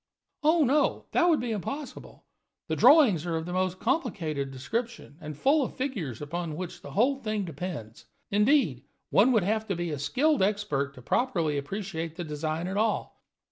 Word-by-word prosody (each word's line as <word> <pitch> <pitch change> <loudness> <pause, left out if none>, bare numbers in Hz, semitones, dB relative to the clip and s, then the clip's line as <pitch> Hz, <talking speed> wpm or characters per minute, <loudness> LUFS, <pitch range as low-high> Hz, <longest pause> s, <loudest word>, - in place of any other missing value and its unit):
"Oh, 315 +1 +4
no, 285 +3 +2
that 350 0 +3
would 320 - +4
be 240 -1 -3
impossible. 275 - -6 0.4
The - - +1
drawings 245 - +6
are 165 - -1
of 160 0 -2
the 175 - -5
most 185 0 0
complicated 190 - -1
description, 225 - -4
and 150 -2 -7
full 280 - +3
of - - -5
figures 185 - -3
upon 165 +1 -4
which 180 -1 -6
the - - -10
whole 260 +7 +3
thing 215 -5 -2
depends. 145 -9 -7 0.3
Indeed, 210 - +3 0.3
one 230 +6 +5
would 220 -6 +3
have 220 +3 0
to 195 - -1
be 175 -1 -3
a 145 - -3
skilled 290 - +2
expert 190 -9 0
to 125 - -13
properly 170 - 0
appreciate 165 +1 -4
the 175 - -4
design 155 +1 -3
at 190 +2 -3
all. 215 0 -1
190 Hz, 180 wpm, -28 LUFS, 155-245 Hz, 0.4 s, drawings